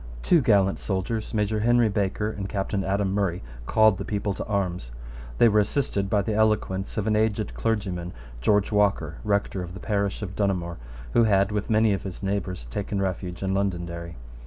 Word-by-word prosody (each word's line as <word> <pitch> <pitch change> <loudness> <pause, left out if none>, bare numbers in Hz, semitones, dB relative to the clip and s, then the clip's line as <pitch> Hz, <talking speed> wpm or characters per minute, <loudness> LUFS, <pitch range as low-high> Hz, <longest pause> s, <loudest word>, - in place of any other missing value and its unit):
Two 170 - +4
gallant 100 -5 +3
soldiers, 105 +3 -2
Major 105 0 0
Henry 120 +1 +4
Baker 105 +1 -1
and 100 -2 -5
Captain 100 -1 -1
Adam 95 0 0
Murray, 95 -3 0 0.2
called 110 -3 +4
the - - -2
people 100 0 -2
to - - -5
arms. 90 - -2 0.5
They 120 - +6
were 105 -1 +4
assisted 105 -3 0
by 100 0 +2
the 110 - -1
eloquence 105 -2 0
of 105 - 0
an 110 -1 +2
aged 110 -1 0
clergyman, 95 -6 -2 0.3
George 105 - +2
Walker, 100 -7 +1
rector 100 -2 0
of 90 0 -7
the - - -7
parish 100 +1 -1
of 95 -1 -6
Donaghmore, 90 -4 -1 0.4
who 115 - +5
had, 100 -1 +3
with 105 -1 -2
many 110 -1 +4
of 95 - -2
his 95 0 -7
neighbours, 95 -7 -2
taken 100 - -2
refuge 90 -1 -3
in 95 0 0
Londonderry. 85 -3 -2
100 Hz, 185 wpm, -25 LUFS, 95-105 Hz, 0.5 s, They